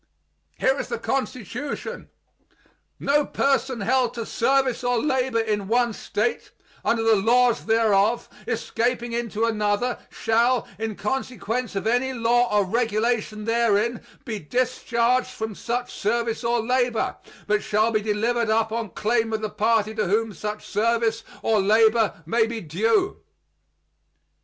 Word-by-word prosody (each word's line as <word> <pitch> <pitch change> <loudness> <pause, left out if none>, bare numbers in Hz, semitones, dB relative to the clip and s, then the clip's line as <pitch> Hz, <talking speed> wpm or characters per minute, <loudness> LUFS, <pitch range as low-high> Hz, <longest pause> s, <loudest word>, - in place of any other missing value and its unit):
Here - - +2
is - - -3
the 470 - -3
Constitution: 255 - -4 0.9
"No 290 +1 +2
person 265 -4 0
held 250 +2 +1
to 230 -2 -4
service 265 +1 +1
or 245 0 +1
labor 260 -2 +1
in 210 -3 -1
one 240 +1 +2
State, 215 +3 -2 0.3
under 230 -1 +1
the 225 -1 +5
laws 235 +4 +3
thereof, 220 0 +3 0.2
escaping 240 0 -1
into 230 -2 -1
another, 215 +2 0
shall, 235 +2 +1
in 220 -1 -3
consequence 250 0 -3
of 195 - -2
any 245 +3 +1
law 240 0 +2
or 205 -1 +3
regulation 215 0 -1
therein, 230 0 +1 0.2
be 215 -3 -4
discharged 245 +5 0
from 220 -3 -5
such 245 +4 -3
service 230 +2 -1
or 235 -1 +1
labor, 245 -2 0 0.3
but 210 0 +1
shall 215 +2 +1
be 215 -1 +1
delivered 220 +2 0
up 220 0 +2
on 225 -2 -3
claim 225 +2 0
of 220 - -1
the 215 -1 -3
party 220 0 +1
to 215 -3 -1
whom 215 +3 +1
such 210 +3 -5
service 225 +1 +1 0.2
or 220 -2 +3
labor 220 -2 +3
may 220 +6 +2
be 230 0 -4
due." 220 - 0
230 Hz, 135 wpm, -24 LUFS, 215-245 Hz, 0.9 s, the